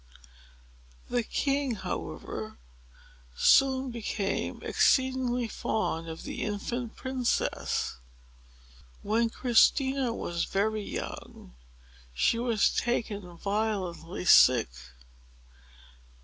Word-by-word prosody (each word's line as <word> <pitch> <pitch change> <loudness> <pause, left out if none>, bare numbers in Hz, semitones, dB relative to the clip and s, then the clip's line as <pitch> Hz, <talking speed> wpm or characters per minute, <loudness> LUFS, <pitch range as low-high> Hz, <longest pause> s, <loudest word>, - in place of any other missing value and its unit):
The 245 - +2
king, 275 +2 -1
however, 195 - -6 0.8
soon 265 - +4
became 210 -3 -3
exceedingly 255 -2 +2
fond 165 -7 -2
of 160 - -7
the - - -6
infant 225 +3 -3
princess. 260 - -1 1.1
When 225 +3 +1
Christina 265 +2 +3
was 170 -6 -3
very 215 +2 0
young, - - -7 0.6
she 230 - +2
was 235 -3 +2
taken 205 -7 -2
violently 195 -4 -3
sick. 125 - +6
225 Hz, 80 wpm, -28 LUFS, 200-250 Hz, 1.1 s, sick